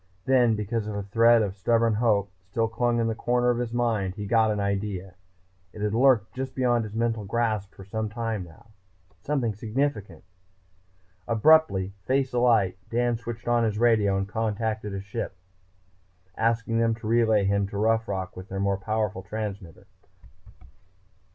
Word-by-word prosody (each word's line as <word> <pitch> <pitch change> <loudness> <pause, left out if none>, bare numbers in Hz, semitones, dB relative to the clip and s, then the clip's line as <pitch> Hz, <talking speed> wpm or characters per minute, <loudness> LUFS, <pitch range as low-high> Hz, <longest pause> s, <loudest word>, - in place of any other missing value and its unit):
Then, 125 -4 +4
because 105 +1 -3
a 100 -1 -4
thread 115 +3 +4
of 100 -2 -3
stubborn 115 +3 +2
hope 105 -3 +1 0.2
still 115 +3 0
clung 120 +1 0
in 115 - +1
a 115 - 0
corner 120 +2 +1
of 120 - -1
his 120 -2 -3
mind, 115 -6 0
he 105 -1 -5
got 110 +1 +3
an 105 -1 -1
idea. 100 -2 -3 0.6
It 105 - -9
had 105 0 0
lurked 120 -3 +3
just 130 0 -5
beyond 120 -3 +1
his 105 0 -9
mental 115 -1 0
grasp 110 -1 -2
for 95 - -11
some 110 +2 -3
time 115 -3 -3
now. 85 +6 -16 0.5
Something 130 -7 -1
significant.... 110 - -3 1.0
Abruptly, 115 -6 +4
face 135 0 +1
alight, 115 -7 +2
Dan 120 0 +1
switched 115 0 -7
on 120 -1 +3
his 110 -2 0
radio 110 -4 +3
and 95 0 -2
contacted 110 0 -2
a 95 - -4
ship 95 -1 -5 1.0
below, 115 - +1
asking 115 0 0
them 115 -1 +2
to 110 - -12
relay 110 -2 +3
him 100 0 +1
to 100 - -6
Rough 115 +2 +1
Rock 95 -1 -4
with 90 +2 -10
their 95 - -4
more 100 0 +1
powerful 105 0 -2
transmitter. 100 -4 -6
110 Hz, 165 wpm, -26 LUFS, 100-115 Hz, 1.0 s, Then